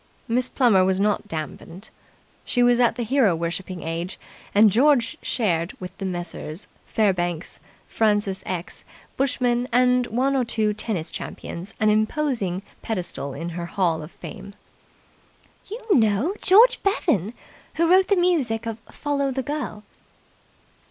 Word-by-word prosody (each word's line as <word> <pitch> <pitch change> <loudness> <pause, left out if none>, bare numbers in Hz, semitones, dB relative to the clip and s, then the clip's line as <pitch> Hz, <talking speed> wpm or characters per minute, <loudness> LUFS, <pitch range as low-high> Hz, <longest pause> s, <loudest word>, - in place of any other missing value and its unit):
Miss 250 +1 +1
Plummer 225 -8 +4
was 190 0 +1
not 210 +1 +1
damped. 165 +3 -7 0.5
She 245 - +1
was 245 0 +4
at 240 -1 +3
the 245 - -2
hero 230 -6 +3
worshipping 170 +2 -4
age, 170 +4 -4 0.4
and 210 0 +7
George 270 +3 +3
shared 170 -7 -1
with 180 0 -8
the 195 - -2
Messrs. 175 -1 -5 0.2
Fairbanks, 175 -5 -1 0.3
Francis 205 -3 +1
X. 180 -1 -4 0.3
Bushman, 250 -3 0
and 250 0 +3
one 265 +4 +1
or 260 - +2
two 220 -2 0
tennis 205 -6 -3
champions 180 +6 -7
an 215 -1 +4
imposing 215 -4 0 0.2
pedestal 175 -9 -4
in 170 +1 -4
her 170 0 -5
Hall 170 -3 0
of 155 +3 -9
Fame. 200 -1 -10 1.1
"You 435 +4 -6 0.2
know! 225 - +2
George 440 +6 +6
Bevan, 245 - 0 0.4
who 335 +1 +2
wrote 370 +2 +5
the 400 - +3
music 285 -11 +1
of 225 -1 -4
'Follow 280 -1 -1
the 265 0 -2
Girl'." 250 -7 -4
215 Hz, 140 wpm, -23 LUFS, 185-255 Hz, 1.1 s, and